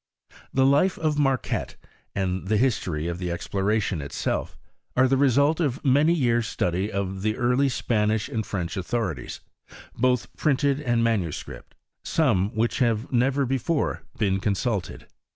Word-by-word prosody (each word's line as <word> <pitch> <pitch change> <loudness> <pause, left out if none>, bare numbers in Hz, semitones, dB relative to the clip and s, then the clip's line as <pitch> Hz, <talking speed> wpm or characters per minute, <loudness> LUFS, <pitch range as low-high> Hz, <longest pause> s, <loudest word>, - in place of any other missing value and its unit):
The 130 0 +3
life 145 +8 +3
of 155 -2 0
Marquette, 135 -3 0 0.4
and 95 -1 -2
the 110 +1 +2
history 105 -10 0
of 85 0 -3
the 90 -1 -3
exploration 100 +1 -1
itself, 70 0 -3 0.4
are 130 +1 +5
the 135 - +2
result 140 +4 +3
of 145 -3 -1
many 145 +5 +4
years 120 -6 +1
study 95 +1 -1
of 95 -1 -3
the 110 +1 -1
early 125 +3 +2
Spanish 110 -2 0
and 115 -5 -2
French 90 -3 -4
authorities, 95 - -3 0.5
both 125 0 0
printed 140 -1 +1
and 120 -4 +1
manuscript, 100 -9 -3 0.3
some 115 - +2
of - - -11
which 115 +4 0
have 115 -2 +1
never 135 +3 +2
before 135 +5 -1 0.2
been 95 -3 +1
consulted. 100 0 -2
115 Hz, 145 wpm, -25 LUFS, 95-135 Hz, 0.5 s, are